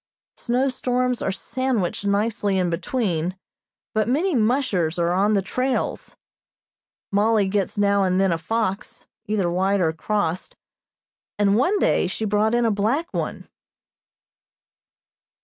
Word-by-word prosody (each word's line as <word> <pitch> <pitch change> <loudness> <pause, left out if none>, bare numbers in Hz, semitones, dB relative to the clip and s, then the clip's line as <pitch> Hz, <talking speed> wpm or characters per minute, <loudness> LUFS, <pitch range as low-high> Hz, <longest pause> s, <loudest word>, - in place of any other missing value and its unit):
Snow 250 +3 0
storms 250 -1 -1
are - - 0
sandwiched 220 -3 -2
nicely 205 -1 0
in 180 -2 +1
between, 180 -1 -1 0.6
but 215 0 +1
many 325 +9 +1
"mushers" 215 - +1
are 170 0 +1
on 200 +4 +2
the 195 - +1
trails. 255 +6 -2 1.0
Mollie 210 0 +3
gets 195 0 -1
now 200 0 +3
and 185 0 +1
then 195 -1 +3
a 165 - 0
fox, 200 +2 -3 0.2
either 205 -3 0
white 190 +3 +1
or 160 -3 +1
crossed, 185 0 -2 0.8
and 200 -1 +3
one 360 - +2
day 280 - +2
she 205 +4 -3
brought 215 +2 +2
in 240 0 +2
a 225 - +3
black 225 +11 -1
one. - - -4
205 Hz, 130 wpm, -23 LUFS, 190-240 Hz, 1.0 s, Mollie